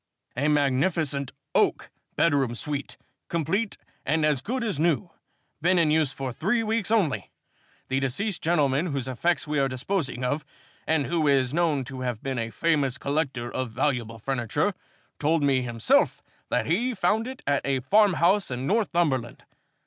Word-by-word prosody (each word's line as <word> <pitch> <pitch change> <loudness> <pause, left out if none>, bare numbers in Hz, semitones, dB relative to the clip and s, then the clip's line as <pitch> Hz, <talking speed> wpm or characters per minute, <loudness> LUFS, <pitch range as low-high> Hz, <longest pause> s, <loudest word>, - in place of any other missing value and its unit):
"A 140 +4 0
magnificent 145 0 +1 0.2
oak - - +1 0.2
bedroom 140 -7 +2
suite, 145 +3 -3 0.3
complete 185 +7 -1 0.3
and 155 +2 +1
as 150 -4 +1
good 250 - -2
as 205 -10 -2
new, 160 -6 +1 0.5
been 180 +3 +3
in 160 -3 +3
use 155 -3 +2
for 135 -2 -5
three 220 - 0
weeks 220 -2 0
only. 205 -11 +1 0.6
The 130 +1 0
deceased 175 - -2
gentleman 155 -1 +2
whose 140 -5 -3
effects 165 +7 0
we 150 -1 0
are 135 - +3
disposing 130 0 -2
of, 145 +4 -1 0.4
and 160 -3 +2
who 165 -3 0
is 135 -2 +3
known 160 -5 +1
to 130 +1 -7
have 125 -3 -3
been 135 -2 -2
a 115 0 -2
famous 140 -1 +1
collector 140 -5 -2
of 130 -2 -2
valuable 120 -2 -1
furniture, 135 - -1 0.5
told 155 +1 +2
me 135 -2 +3
himself 120 -2 +1 0.3
that - - +1
he 230 - 0
found 220 +2 +1
it 260 0 -8
at 140 -1 +1
a 135 -2 0
farmhouse 190 - +3
in 125 +1 -3
Northumberland. 170 - 0
145 Hz, 155 wpm, -26 LUFS, 130-175 Hz, 0.6 s, been